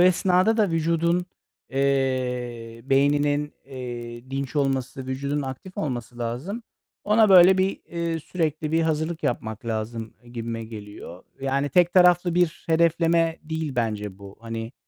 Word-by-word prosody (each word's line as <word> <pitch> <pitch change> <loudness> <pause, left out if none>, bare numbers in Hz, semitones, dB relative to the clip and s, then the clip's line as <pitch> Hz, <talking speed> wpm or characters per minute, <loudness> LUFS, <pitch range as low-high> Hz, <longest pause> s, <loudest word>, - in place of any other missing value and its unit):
esnada 185 +4 +4
da 210 -5 +2
vücudun, 170 +2 +1 0.4
eee, 125 -4 -1
beyninin, 145 +2 +2
eee, 120 -2 -7
dinç 135 +2 -3
olması, 135 -1 -1
vücudunun 140 +2 -2
aktif 135 +8 -7
olması 120 - -4
lazım. 125 - -4 0.4
Ona 215 0 +5
böyle 185 0 +8
bir, 190 +1 0
eee, 170 -1 -2
sürekli 155 -2 -2
bir 165 0 +3
hazırlık 160 +1 -1
yapmak 110 -1 -3
lazım, 110 0 -4
eee, 120 - -16
gibime 115 -1 -4
geliyor. 105 -5 -10 0.2
Yani 135 +1 0
tek 175 +4 +3
taraflı 180 -1 +5
bir 175 -2 +1
hedefleme 165 0 +3
değil 160 -1 -3
bence 105 -4 -2
bu. 100 0 -12
Hani, 115 0 -5
140 Hz, 135 wpm, -24 LUFS, 120-170 Hz, 0.4 s, böyle